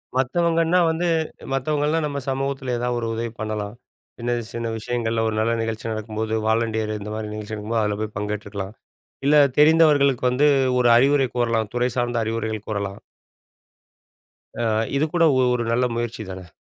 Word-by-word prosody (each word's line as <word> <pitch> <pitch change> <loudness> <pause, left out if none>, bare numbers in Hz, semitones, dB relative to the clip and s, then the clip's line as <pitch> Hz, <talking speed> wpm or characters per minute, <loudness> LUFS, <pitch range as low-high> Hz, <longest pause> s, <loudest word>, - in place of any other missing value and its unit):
மத்தவங்கன்னா 165 +6 +2
வந்து, 165 +2 0 0.5
மத்தவங்கல்லாம் 150 +3 0
நம்ம 140 -1 -3
சமூகத்தில 135 -1 -2
ஏதாவது 120 0 -1
ஒரு 115 - -3
உதவி 115 0 -3
பண்ணலாம். 110 -1 -3 0.5
சின்ன, 120 +1 -1 0.2
சின்ன 115 0 -3
விஷயங்கள்ல 115 0 -1
ஒரு 110 - -1
நல்ல 110 +1 +1
நிகழ்ச்சி 115 0 -4
நடக்கும் 110 0 -5
போது 110 0 -1
வாலண்டியர் 110 -1 0
இந்த 105 +1 -7
மாரி 110 -1 -5
நிகழ்ச்சி 105 0 -6
நடக்கும்போது, 110 +1 -1
அதுல 105 -1 -1
போய் 110 -1 -4
பங்கேற்றுக்கலாம். 105 -1 -4 0.5
இல்ல 150 +2 +5 0.2
தெரிந்தவர்களுக்கு 150 -5 +5
வந்து 145 +4 +3 0.3
ஒரு 120 - +4
அறிவுரை 135 +1 +4
கூறலாம். 115 -3 0
துறை 125 +1 +1
சார்ந்த 120 0 0
அறிவுரைகள் 110 -1 -3
கூறலாம். 100 -2 -3 1.6
அ - - 0 0.3
இது 155 - +2
கூட 175 -1 +3
ஒ - - +3 0.2
ஒரு 120 - -1
நல்ல 125 +2 +2
முயற்சி 120 -1 -3
தான. 95 -1 -8
115 Hz, 155 wpm, -23 LUFS, 110-135 Hz, 1.6 s, இல்ல